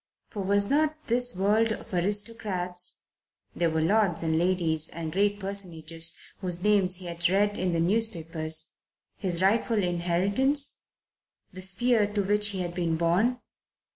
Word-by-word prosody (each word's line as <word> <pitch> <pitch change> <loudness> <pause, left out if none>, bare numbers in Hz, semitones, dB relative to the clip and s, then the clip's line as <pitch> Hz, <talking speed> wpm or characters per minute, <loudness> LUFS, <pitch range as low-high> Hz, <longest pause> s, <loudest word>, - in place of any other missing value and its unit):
For 205 - -5
was 200 +1 +1
not 305 +3 +1
this 245 -1 +1
world 210 +4 +2
of 220 - -7
aristocrats 185 -2 -2 0.5
there 170 -1 +1
were 160 0 0
lords 195 -1 +2
and 160 -1 0
ladies 165 -2 0
and 165 -2 -6
great 205 +3 +1
personages 165 -5 -1 0.2
whose 180 -2 -3
names 200 -3 +3
he 180 0 -8
had 170 0 -1
read 205 +2 +2
in 185 -2 -1
the 165 - 0
newspapers 165 -5 0 0.4
his 180 -2 0
rightful 225 +3 +2
inheritance, 190 +11 +1 0.7
the 185 - -7
sphere 210 +3 +2
to 205 - +1
which 210 +2 +3
he 195 -2 -1
had 175 -1 -4
been 170 -2 -1
born? 190 +10 +1
185 Hz, 145 wpm, -27 LUFS, 170-210 Hz, 0.7 s, names